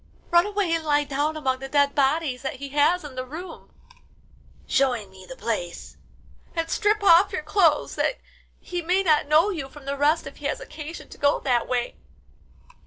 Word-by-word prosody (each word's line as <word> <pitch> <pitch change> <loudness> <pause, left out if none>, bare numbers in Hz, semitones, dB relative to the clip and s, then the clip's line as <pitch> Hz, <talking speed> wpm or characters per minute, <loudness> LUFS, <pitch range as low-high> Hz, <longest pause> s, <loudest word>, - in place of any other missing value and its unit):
Run 345 +3 +5
away 410 -4 -1
and 330 -1 0
lie 295 -1 +2
down 290 +2 -1
among 260 -4 -1
the 270 0 -7
dead 285 0 +3
bodies 275 -1 +1
that 270 - -4
he 280 +1 -7
has 295 +5 +2
in 295 -3 -8
the 255 0 -4
room 320 +8 -9 0.9
(showing 245 -7 0
me 190 -1 -14
the 260 - -7
place), 210 -9 -4 0.6
and 330 -1 -2
strip 420 0 +1
off 385 +1 +6
your 370 -5 -3
clothes 320 -2 +2
that - - 0 0.4
he 355 -1 -5
may 365 +3 +1
not 305 -4 +3
know 315 +7 +4
you 300 -8 -5
from 290 0 -14
the 280 0 -2
rest 290 +3 +2
if - - -9
he - - -10
has - - -2
occasion 325 -9 -9
to - - -13
go 285 0 +2
that 245 -3 +1
way." 245 -1 -2
295 Hz, 190 wpm, -24 LUFS, 270-345 Hz, 0.9 s, off